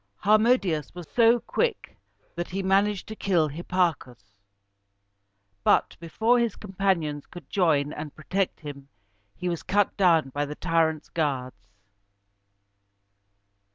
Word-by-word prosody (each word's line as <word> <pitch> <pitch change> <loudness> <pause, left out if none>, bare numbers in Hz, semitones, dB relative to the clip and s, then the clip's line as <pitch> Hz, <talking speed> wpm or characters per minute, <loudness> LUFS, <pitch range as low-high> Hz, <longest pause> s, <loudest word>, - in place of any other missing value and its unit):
Harmodius 205 - +2
was 175 -3 -8
so 235 0 +5
quick 470 - -2 0.4
that 175 0 -4
he 195 +1 -3
managed 195 +1 +2
to 220 - -7
kill 175 -7 +1
Hipparchus; 145 - -2 1.3
but, - - +3
before 220 +9 +1
his 235 -3 0
companions 185 -7 -1
could 175 -6 -12
join 150 -6 +2
and 150 -1 -7
protect 185 +5 -2
him, 140 -2 -9 0.5
he 180 - -4
was 170 -2 -2
cut 205 0 +1
down 165 -7 +4
by 145 +2 -2
the 145 +1 -5
tyrants' 160 -3 0
guards. 130 -10 -3
175 Hz, 120 wpm, -26 LUFS, 150-195 Hz, 1.3 s, so